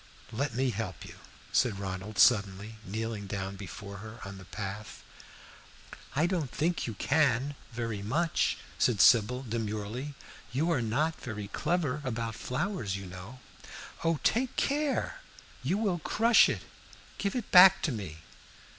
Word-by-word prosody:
"Let 120 +1 -2
me 130 0 +1
help 105 -3 -5
you," - - -10 0.4
said 115 -6 +3
Ronald 95 +1 -5
suddenly, 105 -1 +3
kneeling 110 0 -4
down 95 0 -4
before 100 +1 -8
her 110 +4 -9
on 100 0 -8
the 95 - -11
path. 105 +2 -6 1.1
"I 150 +4 +3
don't 175 -6 -1
think 165 +3 -1
you 115 - -4
can 140 0 +2 0.2
very 115 -3 -3
much," 155 +11 +1 0.2
said 115 -5 +3
Sybil, 115 +5 +5
demurely. 115 +4 -4 0.4
"You 155 +7 +1
are 140 -7 +2
not 145 +9 0
very 105 -4 -5
clever 150 - -1
about 115 -3 -2
flowers, 125 - -2
you 95 - -7
know. 95 +8 -10 0.6
Oh, 165 -2 +2
take 255 +2 +1
care! 290 0 0 0.4
You 155 +10 0
will 200 -5 0
crush 225 +8 +5
it - - -3 0.6
give 200 +2 -1
it 245 -4 -4
back 185 +1 +9
to 155 - +1
me!" 90 -9 -6
115 Hz, 145 wpm, -30 LUFS, 105-155 Hz, 1.1 s, back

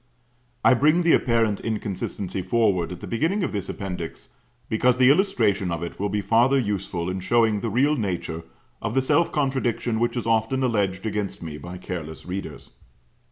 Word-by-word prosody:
I - - +7
bring 155 +7 +3
the 170 - +4
apparent 115 -4 +2
inconsistency 100 -3 -3
forward 100 -6 +1
at 90 - -8
the - - -6
beginning 165 - 0
of - - -1
this 100 -2 -4
Appendix, 90 -4 -6 0.4
because 125 +3 +2
the 130 +1 +6
illustration 115 - +2
of 85 -1 -3
it 85 - -7
will 100 +1 0
be 105 +1 -1
farther 115 +7 +3
useful 100 -7 -2
in 95 +1 -2
showing 110 +2 +2
the 115 - -2
real 135 +8 +2
nature 90 - -3 0.4
of - - -3
the 135 - +4
self 165 +5 +2
contradiction 130 -5 0
which 120 +2 0
is 120 - -2
often 115 +4 +1
alleged 100 -5 0
against 105 -4 -3
me 75 -2 -6
by 90 +4 -8
careless 80 -5 -6
readers. 90 -6 -6
110 Hz, 175 wpm, -24 LUFS, 95-125 Hz, 0.4 s, I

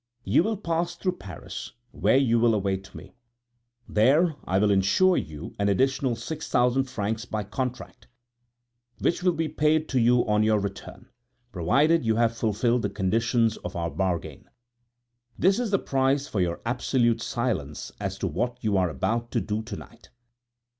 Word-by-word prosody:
You 100 - +3
will 215 +3 -1
pass 170 -2 -2
through 180 +1 -2
Paris, 90 -5 -8 0.2
where - - +2
you 120 -4 +3
will 115 -1 +4
await 95 -1 -3
me. - - -11 0.7
There 150 +9 +3
I 95 - +1
will 105 +1 +3
insure 100 - +3
you 75 - -5
an 100 0 +2
additional 130 +4 +1
six 150 +7 -6
thousand 125 +2 +2
francs 115 -2 -3
by 110 -3 -3
contract, 125 +5 -5 0.9
which 170 - 0
will 180 -1 +3
be 165 0 -1
paid 155 +1 +1
to 130 - +1
you 120 +1 +4
on 105 0 +2
your 110 0 +3
return, 100 -1 -6 0.4
provided 135 - +2
you 110 -1 +1
have 115 0 +2
fulfilled 115 +2 +1
the 100 - -1
conditions 115 +3 +1
of 90 +2 -7
our 85 -1 -2
bargain. 90 0 -3 0.9
This 195 +4 +3
is 245 -3 -1
the 200 - +3
price 135 -2 0
for 100 - -1
your 85 -1 -1
absolute 120 -1 +1
silence 110 - -3
as 100 -1 -3
to 95 - -2
what 120 +9 -2
you 105 -3 +1
are 90 -2 +2
about 115 - -2
to - - +2
do 105 0 -2
to 110 -2 -7
night. 115 +3 -13
115 Hz, 165 wpm, -26 LUFS, 100-135 Hz, 0.9 s, will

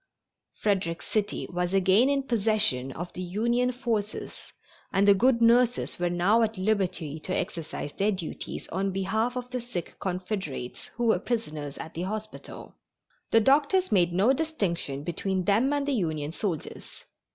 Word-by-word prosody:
Frederick 185 -5 0
City 210 -2 -1
was 180 +1 -1
again 195 +7 +5
in 280 -1 +1
possession 215 - +1
of 175 +2 -6
the 185 - -5
Union 235 +7 +1
forces 225 -4 -4 0.4
and 195 +1 +3
the 200 - +9
good 235 +4 +3
nurses 240 -1 +3
were 175 0 +1
now 180 +6 +3
at 220 -2 0
liberty 185 -6 -1
to 185 +4 -3
exercise 155 -3 -4
their 205 +2 +1
duties 185 -5 -5
in 195 +2 0
behalf 220 +6 0
of 250 -1 -4
the 250 -1 -2
sick 230 -8 -6
Confederates 180 - -4
who 240 +1 -1
were 220 -6 +4
prisoners 155 - -3
at 160 - -7
the 165 - -4
hospital. 215 +3 -6 0.6
The 225 - +5
doctors 290 - +3
made 180 -4 +4
no 200 +9 +4
distinction 195 - -2
between 185 +3 -1
them 220 +9 +3
and 285 -1 0
the 285 - +1
Union 155 - -1
soldiers. 175 -2 -5
200 Hz, 155 wpm, -27 LUFS, 175-235 Hz, 0.6 s, the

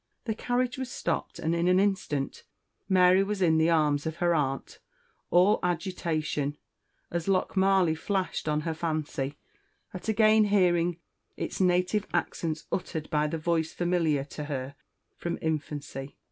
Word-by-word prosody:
The 225 - 0
carriage 245 +3 -1
was 260 -1 -3
stopped - - -3
and 160 - -1
in 170 +1 +1
an 180 +1 +5
instant 190 -8 -1 0.5
Mary 185 0 +5
was 205 0 -2
in 160 -4 +4
the 160 +1 +3
arms 150 -3 +2
of 160 - -3
her 175 0 +2
aunt, 135 -4 -2 0.5
all 185 +4 +5
agitation, 160 -5 -1 0.5
as 170 0 -2
Lochmarlie 190 -2 +3
flashed 185 +1 -2
on 150 0 +1
her 165 +1 -2
fancy, 155 -3 -3 0.6
at 185 +4 -5
again 215 0 +5
hearing 175 -4 +2 0.4
its - - -3
native 180 +3 +2
accents 165 -2 -2
uttered 165 -4 -3
by 150 0 +2
the 165 - -2
voice 160 0 0
familiar 170 -5 +1
to 150 +1 -7
her 135 -2 -4 0.4
from 170 0 -3
infancy. 145 -3 -4
170 Hz, 145 wpm, -28 LUFS, 155-190 Hz, 0.6 s, an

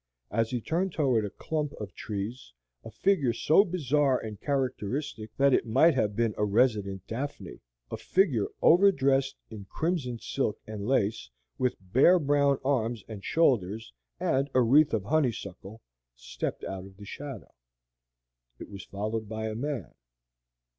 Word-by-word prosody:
As 115 +1 +1
he 125 -2 -2
turned 175 - -1
toward 130 -8 +2
a - - -4
clump 150 +7 -3
of 100 -4 -8
trees, 105 - -6 0.3
a - - -8
figure 150 -12 +1
so 160 +11 +4
bizarre 145 - +1
and 110 -3 -7
characteristic 130 -3 -2
that 140 0 +4
it - - +2
might 160 +9 +5
have 105 -6 0
been 115 -1 +1
a - - +2
resident 105 -3 +1
Daphne 115 -6 -6 0.3
a 110 - -3
figure 125 - +1 0.2
over 195 +4 +7
dressed 135 -3 +1 0.2
in 105 -3 -8
crimson 145 - -2
silk 115 -1 -2
and 105 -1 -6
lace, 110 - 0 0.3
with 125 -1 +1
bare 130 - +4
brown 140 -3 +2
arms 120 -5 0
and 105 -3 -8
shoulders, 115 - +1 0.3
and 135 +2 +1
a 130 - +6
wreath 145 +6 +5
of 105 - -2
honeysuckle 110 - -2 0.3
stepped 60 - -5
out 95 -1 -5
of 95 -1 -17
the 100 - -11
shadow. 135 +1 -8 1.0
It - - -10
was 100 0 -8
followed 110 +2 -4
by 110 0 -3
a - - -4
man. 125 - -4
120 Hz, 155 wpm, -28 LUFS, 105-140 Hz, 1.0 s, over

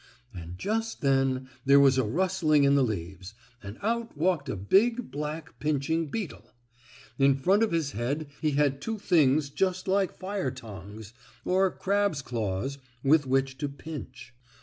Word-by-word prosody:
And 85 -1 -8
just 225 - -2
then 135 -2 +1 0.2
there 140 +1 +6
was 135 -2 +5
a - - +3
rustling 160 - +2
in 140 0 +4
the 140 - +4
leaves, 95 -3 -4 0.3
and 100 +2 -9
out 230 -4 -2
walked 160 -3 0
a - - -2
big 225 - +2
black, 150 +2 -5
pinching 155 +2 0
beetle. 195 +3 -6 0.7
In 135 0 +5
front 185 +10 +2
of 225 - +2
his 160 -4 0
head 135 +8 -2 0.2
he 155 -2 +1
had 140 -1 +1
two 225 -1 -3
things 150 -6 +3
just 185 +3 -1
like 195 0 +1
fire 190 -5 -2
tongs, 105 -1 -10 0.3
or 190 +1 +3
a - - -4
crab's 200 -6 0
claws, 115 +3 -3 0.2
with 145 0 +4
which 135 0 0
to 145 -2 -2
pinch. 135 -4 -9
140 Hz, 160 wpm, -28 LUFS, 130-185 Hz, 0.7 s, there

